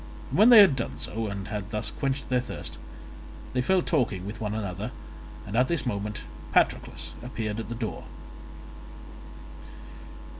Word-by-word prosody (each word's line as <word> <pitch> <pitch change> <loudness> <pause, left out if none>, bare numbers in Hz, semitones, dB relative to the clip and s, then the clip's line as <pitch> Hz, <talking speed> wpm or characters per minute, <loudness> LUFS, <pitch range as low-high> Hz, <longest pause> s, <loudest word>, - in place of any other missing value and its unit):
When 220 - +6
they 235 -4 +11
had 180 -9 +6
done 120 - -3
so 110 0 -2
and 100 0 -5
had 105 -2 -4
thus 105 -1 -3
quenched 135 +3 -2
their 125 -1 +3
thirst, 125 - -6 0.7
they 125 - +1
fell 185 +7 +3
talking 115 - 0
with 105 +3 -6
one 105 -1 -2
another, 100 -5 -3 0.5
and 100 - -5
at 125 +2 +4
this 170 -8 -1
moment 105 -2 -3 0.3
Patroclus - - +1
appeared 115 -3 -4
at 115 - -5
the 120 - -4
door. 110 -5 -4
115 Hz, 150 wpm, -27 LUFS, 105-130 Hz, 0.7 s, they